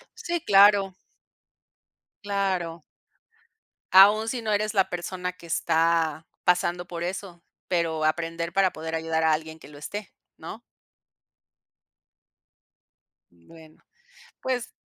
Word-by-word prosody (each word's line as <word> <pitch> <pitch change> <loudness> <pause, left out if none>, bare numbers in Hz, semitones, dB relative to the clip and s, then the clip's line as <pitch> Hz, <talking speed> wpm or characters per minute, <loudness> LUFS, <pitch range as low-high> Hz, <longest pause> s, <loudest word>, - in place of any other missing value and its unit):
Sí, 345 -7 -3
claro. 200 -1 +5 1.3
Claro. 185 -5 -2 1.1
Aún 205 +4 +7
si 240 +1 -2
no 220 - -2
eres 210 +1 0
la 190 -1 +2
persona 180 +1 -4
que 170 - -16
está 165 -1 +1 0.2
pasando 175 0 +1
por 170 -1 -5
eso, 180 -1 -6 0.3
pero 165 -3 0
aprender 165 +1 -1
para 195 -1 +3
poder 160 +1 -5
ayudar 160 0 -1
a 160 -1 +4
alguien 160 +1 -4
que - - -14
lo 145 - -14
esté, 205 +6 -7 0.2
¿no? - - -9 2.7
Bueno, 155 - -18 0.6
pues 250 -2 -3
175 Hz, 110 wpm, -25 LUFS, 160-200 Hz, 2.7 s, Aún